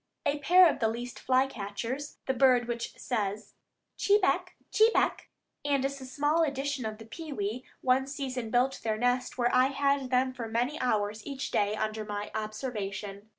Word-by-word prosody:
A 290 +1 +1
pair 355 +5 +7
of 320 - 0
the 225 - +2
least 240 +2 -5
fly 260 0 +3
catchers, 255 +4 -5
the 265 - +1
bird 250 -2 +4
which 235 -1 -4
says 210 -3 -3 0.5
chebec, 405 -1 +2 0.2
chebec, 445 +1 +3 0.4
and 280 -2 +1
is 275 0 -3
a 260 - -7
small 290 +5 +1
edition 280 -4 -1
of 215 0 -6
the 225 - -11
pewee, 245 -4 -4 0.2
one 260 +1 +2
season 260 -4 -4
built 250 +3 +1
their 220 -1 -1
nest 245 +2 0
where 240 -1 +1
I 255 +1 +5
had 275 -1 +1
them 255 +1 +2
for 240 -3 -5
many 245 +7 -1
hours 215 -3 0
each 270 +1 -5
day 205 +1 +1
under 215 0 -2
my 205 0 -5
observation. 215 -2 -5
250 Hz, 170 wpm, -29 LUFS, 220-275 Hz, 0.5 s, pair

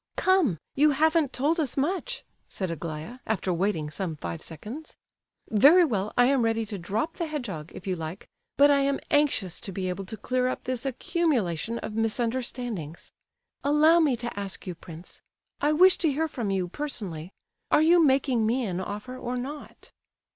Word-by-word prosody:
"Come—you 300 - +2
haven't 315 -2 +3
told 300 +7 +1
us 285 -5 -1
much!" 380 - -1 0.3
said 185 -3 -3
Aglaya, 165 - -6
after 195 -4 0
waiting 170 -4 -1
some 170 -1 -3
five 85 - -6
seconds. 220 - -9 0.5
"Very 295 - +6
well, 210 -7 -1
I 245 - +6
am 270 0 +3
ready 225 -1 +1
to 205 -2 -6
drop 215 - -2
the 335 - -2
hedgehog, 210 - -5
if - - -9
you 190 -2 -1
like; 165 +3 -6 0.3
but 285 +1 +7
I 280 - +4
am 275 0 +1
anxious 285 - +2
to 195 - -6
be 185 0 -3
able 190 +2 -4
to 220 - -6
clear 255 +4 0
up 255 - -3
this 255 +1 -2
accumulation 235 - 0
of 220 - -6
misunderstandings. 225 - -2 0.5
Allow 305 +4 +5
me 295 -6 +3
to 235 -3 -5
ask 195 -2 -5
you, 180 - -4
prince,—I 170 - -6
wish 365 +4 +6
to 320 - +2
hear 315 +4 0
from 240 -8 -4
you, 190 -2 0
personally—are 195 - -3
you 335 +1 +6
making 265 -5 +3
me 245 +2 +1
an 185 -3 -2
offer, 210 +7 -5
or 250 0 -4
not?" 285 +4 -8
240 Hz, 170 wpm, -27 LUFS, 190-290 Hz, 0.5 s, but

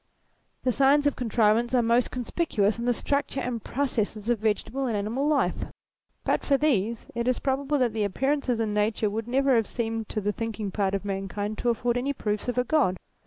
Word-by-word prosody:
The 255 - +2
signs 275 +3 +4
of 290 - +2
con 245 - -3
188 - - -4 0.4
THEISM - - -14
trivance 260 - 0
are 240 -2 +3
most 235 +1 +3
conspicuous 230 -4 0
in 235 - -3
the 245 - +3
structure 280 +1 -1
and. 245 -3 -3
processes 225 -5 -2
of 235 - +1
vegetable 225 +5 -1
and 225 -3 0
animal 230 +8 -1
life. 300 -2 +1 0.6
But - - +1
for 275 - +3
these, 235 -7 0
it 235 +1 -2
is 255 - +2
probable 280 +2 0
that 245 -5 +1
the 220 -1 0
appearances 260 +4 0
in 220 -2 0
nature 210 0 +1
would 225 +2 -3
never 270 +1 +3
have 225 -2 +2
seemed 225 -2 -3
to 215 - -2
the 205 0 -1
thinking 220 -3 -4
part 195 0 0
of 195 - -4
mankind 205 +2 -3
to 240 - +1
afford 240 +1 0
any 275 +3 -1
proofs 210 -4 -2
of 245 - -2
a 250 - +3
God. 250 -9 +2
235 Hz, 215 wpm, -26 LUFS, 210-265 Hz, 0.6 s, signs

